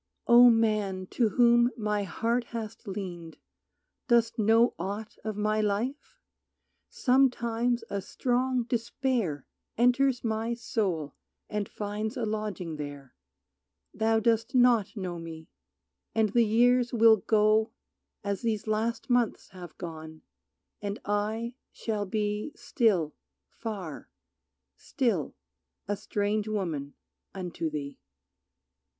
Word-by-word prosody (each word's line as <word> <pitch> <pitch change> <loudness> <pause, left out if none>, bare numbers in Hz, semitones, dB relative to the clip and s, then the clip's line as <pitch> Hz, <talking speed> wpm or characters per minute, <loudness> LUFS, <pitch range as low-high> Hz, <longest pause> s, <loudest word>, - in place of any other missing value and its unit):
O 240 +1 +8
Man 215 -5 +1
to 235 -3 +2
whom 240 +2 +5
my 210 -2 0
heart 235 +5 -1
hast 225 -1 -7
leaned, 180 -5 -6 0.7
dost 235 -2 +3
know 225 +3 +4
Aught 200 +4 -5
of 215 -2 -4
my 215 +1 +1
life? 235 - -2 0.7
Sometimes 245 -2 +2
a 200 - -3
strong 250 +4 0
despair 230 - -1 0.3
Enters 250 +2 +3
my 225 +1 -1
soul 185 - -2 0.4
and 210 -2 -2
finds 215 +3 -4
a 235 - -1
lodging 210 -7 -3
there; 145 -3 -8 0.8
Thou 225 0 +2
dost 225 +2 +1
not 240 -4 +4
know 180 -3 -4
me, 160 -1 -9 0.6
and 220 -1 +3
the 235 +3 +3
years 245 +2 +4
will 225 -2 +6
go 215 +1 +3 0.5
As 200 -1 -2
these 220 -3 -1
last 220 +2 -1
months 245 -3 +1
have 180 -3 -11
gone, 160 -2 -8 0.6
and 205 0 -4
I 215 +3 -1 0.2
shall 210 -3 -3
be 210 +6 -2
Still 185 - +1 0.4
far, 195 -10 -6 0.7
still 225 - -1 0.5
a 205 - 0
strange 205 +1 -1
woman 165 -10 -3 0.4
unto 175 -3 -3
thee. 140 -2 -6
215 Hz, 110 wpm, -28 LUFS, 195-235 Hz, 0.8 s, O